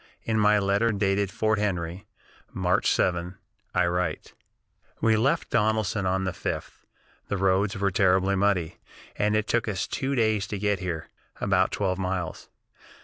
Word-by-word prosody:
In 110 -1 0
my 105 0 +5
letter 100 +3 +2
dated 100 -1 +1
Fort 110 +1 0
Henry, 90 -3 -2 0.4
March 90 -1 +1
7, 90 +1 0 0.4
I 90 - +3
write: 90 +1 -2 0.7
"We 110 -1 +3
left 135 +9 +1
Donelson 110 -3 +1
on 95 +1 0
the 95 - -1
5th. - - -5 0.5
The 100 - -2
roads 95 +2 +1
were 100 0 +1
terribly 95 +1 +3
muddy, 95 -4 +1 0.4
and 105 +1 +1
it 110 0 +1
took 120 0 0
us 95 -4 -1
two 135 +1 -2
days 110 -5 +1
to 105 - -4
get 100 -1 0
here, 85 -3 -4 0.3
about 95 -2 +2
twelve 95 -2 -1
miles. 90 -2 -3
100 Hz, 150 wpm, -26 LUFS, 95-105 Hz, 0.7 s, my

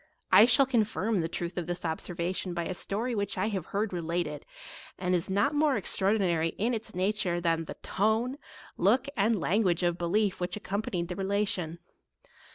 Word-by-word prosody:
I 220 - +9
shall 260 +3 +5
con 245 -4 +3
firm 215 -2 -1
the 160 - -1
truth 175 +1 -4
of 175 - -5
this 175 0 -4
observation 175 +2 -3
by 170 -1 -2
a 185 - -3
story 220 +7 -3
which 200 -2 -2
I 215 - 0
have 190 -6 -4
heard 205 0 -2
related, 165 -3 -3 0.5
and 180 0 -1
is 175 0 0
not 205 +9 +2
more 295 -3 +2
extraordinary 190 -4 +2
in 235 +5 0
its 220 -4 -5
nature 185 -2 0
than 165 -1 0
the - - -7
tone, 225 +7 0 0.4
look, 265 +2 +3
and 215 0 +2
language 180 -2 +1
of 175 0 +1
belief 195 +3 +1
which 180 0 -2
accompa 205 +1 -3
nied 175 -2 -2
the 180 - -5
relation. 195 -4 -1
190 Hz, 180 wpm, -29 LUFS, 175-215 Hz, 0.5 s, I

